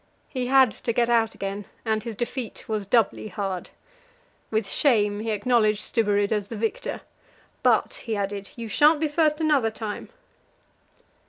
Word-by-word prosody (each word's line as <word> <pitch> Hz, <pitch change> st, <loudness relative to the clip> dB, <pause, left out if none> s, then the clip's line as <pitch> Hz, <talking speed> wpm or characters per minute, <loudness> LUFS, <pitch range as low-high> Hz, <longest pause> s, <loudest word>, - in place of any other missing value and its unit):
He 255 Hz, -2 st, -3 dB
had 265 Hz, -2 st, +5 dB
to 235 Hz, -, -3 dB
get 240 Hz, 0 st, +2 dB
out 225 Hz, -2 st, +2 dB
again, 200 Hz, +1 st, -4 dB, 0.2 s
and 220 Hz, -1 st, +1 dB
his 225 Hz, 0 st, -6 dB
defeat 240 Hz, +1 st, -5 dB
was 215 Hz, -3 st, -2 dB
doubly 220 Hz, -1 st, +2 dB
hard. 190 Hz, -2 st, -4 dB, 0.8 s
With 220 Hz, -2 st, 0 dB
shame 210 Hz, -5 st, +2 dB
he 225 Hz, +1 st, -3 dB
acknowledged 215 Hz, -1 st, +2 dB
Stubberud 205 Hz, -2 st, +1 dB
as 210 Hz, -2 st, 0 dB
the 225 Hz, -, -6 dB
victor; 225 Hz, +1 st, -3 dB, 0.6 s
"but," -, -, +3 dB
he 225 Hz, -2 st, -1 dB
added, 200 Hz, 0 st, -3 dB
"you 230 Hz, -1 st, -6 dB
shan't 295 Hz, +8 st, +4 dB
be 315 Hz, -, +1 dB
first 300 Hz, 0 st, +2 dB
another 295 Hz, -8 st, +3 dB
time." 220 Hz, -1 st, -6 dB
220 Hz, 155 wpm, -25 LUFS, 205-245 Hz, 0.8 s, had